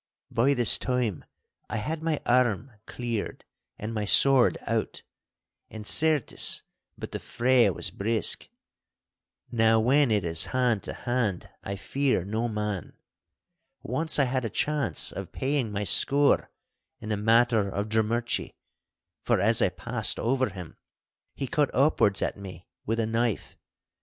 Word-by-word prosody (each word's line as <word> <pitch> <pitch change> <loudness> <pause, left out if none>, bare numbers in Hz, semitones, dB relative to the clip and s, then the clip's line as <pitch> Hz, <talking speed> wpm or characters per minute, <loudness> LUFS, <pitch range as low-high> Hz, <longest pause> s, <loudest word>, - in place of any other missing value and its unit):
By 135 +5 +2
this 120 -3 +5
time 125 - -2 0.4
I 110 - -3
had 155 +9 -3
my 160 -2 -1
arm 120 -1 +1 0.2
cleared 120 -3 -5 0.3
and 110 +2 -5
my 105 -1 -2
sword 130 +5 +5
out, - - -2 0.7
and, 110 -1 -9
certes, 155 +1 +2 0.3
but - - -8
the - - -4
fray 120 -2 +2
was 90 - -1
brisk. 110 +2 -1 1.0
Now, 115 -1 +3
when 135 +4 +3
it 105 -4 +1
is 80 -1 +1
hand 120 -5 +1
to - - -4
hand 115 -7 -2
I 100 - -4
fear 130 -1 -1
no 110 +4 -2
man. 105 -4 -4 0.9
Once 155 +7 -1
I 145 - +4
had 130 0 -1
a 115 - -2
chance 140 - 0
of - - -7
paying 135 -4 -1
my 105 0 -2
score 140 - +3 0.5
in 110 - -8
the 105 - 0
matter 115 -1 +3
of 100 +2 -3
Drummurchie, 110 +2 -1 0.7
for - - +1
as - - +2
I - - +3
passed - - -2
over 130 +1 0
him 90 -4 -10 0.6
he 135 - -3
cut 150 0 0
upwards 125 -8 +3
at - - -2
me 95 -2 -10 0.2
with 115 +2 -1
a 115 - +1
knife. 115 -1 -2
115 Hz, 145 wpm, -27 LUFS, 105-130 Hz, 1.0 s, this